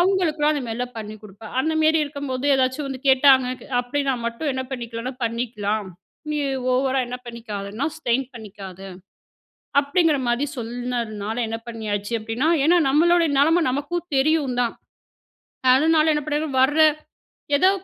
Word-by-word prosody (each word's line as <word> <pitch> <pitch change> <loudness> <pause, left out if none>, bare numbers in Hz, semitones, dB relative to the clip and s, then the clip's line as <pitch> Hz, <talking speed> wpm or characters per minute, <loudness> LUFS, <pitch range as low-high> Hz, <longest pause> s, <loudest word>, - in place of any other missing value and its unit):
அவங்களுக்குலாம் 335 -5 +2
அந்த 290 -3 -2
மாரிலாம் 245 +2 -4
பண்ணி 215 0 -7
குடுப்பேன். 210 +1 -12
அந்தமேரி 315 +2 +2
இருக்கும்போது 280 -3 -5
ஏதாச்சும் 260 +2 0
வந்து 265 -2 -6
கேட்டாங்க 265 -1 +6
க - - -13 0.2
அப்டி 245 +4 -2
நான் 250 -3 -1
மட்டும் 235 +7 -3
என்ன 260 0 -2
பண்ணிக்கலான்னா, 240 -1 -5
பண்ணிக்கலாம். 220 -3 -2 0.4
"நீ 300 - -1 0.3
ஓவரா 265 +1 +1
என்ன 245 +1 -5
பண்ணிக்காதன்னா 220 0 -5
ஸ்ட்ரெயின் 265 -3 0
பண்ணிக்காத" 200 -4 -10 1.0
அப்டிங்கிற 295 +1 +2
மாரி 240 +4 +1
சொல்னதுனால 235 -3 -4
என்ன 225 - -3
பண்ணியாச்சு 215 -1 -3
அப்டின்னா, 225 +7 -1 0.2
ஏன்னா, 345 +3 +5
நம்மளுடைய 335 +3 +4
நலம 325 +5 +4
நமக்கும் 290 +7 -3
தெரியும் 280 -2 +2
தான். 235 -2 0 1.0
அதனால 315 +3 +4
என்ன 295 0 -1
பண்ணிர்வேன் 295 -3 -1
வர்ற 295 +4 +3 0.8
ஏதோ 370 +6 +5
260 Hz, 135 wpm, -23 LUFS, 230-300 Hz, 1.0 s, கேட்டாங்க